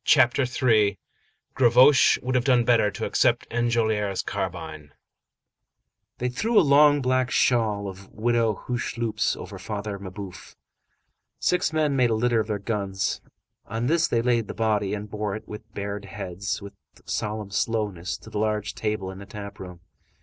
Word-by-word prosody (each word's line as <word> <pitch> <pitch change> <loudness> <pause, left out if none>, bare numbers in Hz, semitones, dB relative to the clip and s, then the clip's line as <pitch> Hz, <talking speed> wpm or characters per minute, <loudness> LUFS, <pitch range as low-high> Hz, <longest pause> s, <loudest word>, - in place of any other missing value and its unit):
CHAPTER 130 +2 +4
III—GAVROCHE 120 +4 +3
WOULD 130 +1 -1
HAVE 130 -1 +2
DONE 125 -2 +3
BETTER 115 -3 +4
TO 100 - -4
ACCEPT - - +2
ENJOLRAS' 110 -4 0
CARBINE 80 -2 -5 1.2
They 125 - -1
threw 210 - +2
a - - +4
long 145 0 +5
black 130 0 +1
shawl 110 -5 +1
of 95 0 -9
Widow 115 -2 0
Hucheloup's 115 -3 -1
over - - -9
Father 105 -1 -5
Mabeuf. 95 -1 -9 0.8
Six 180 -2 +1
men 155 -3 +1
made 125 -2 +3
a 110 - +1
litter 120 +1 +2
of 110 - -1
their 105 -2 -1
guns; 100 -2 -2 0.5
on 115 +3 -3
this 165 +5 +2
they 115 -1 0
laid 120 -3 +1
the - - -6
body, 105 -3 0
and 105 0 -6
bore 105 -1 -3
it, 110 - -9
with 105 +1 -10
bared 100 0 -4
heads, 100 0 -5
with 100 - -9 0.3
solemn 105 -1 -3
slowness, 100 -5 -2
to 110 - -14
the 105 - -3
large 105 -1 -1
table 105 -3 -3
in 95 - -10
the 100 - -10
tap 100 -1 -8
room. 90 -2 -9
110 Hz, 155 wpm, -25 LUFS, 100-120 Hz, 1.2 s, long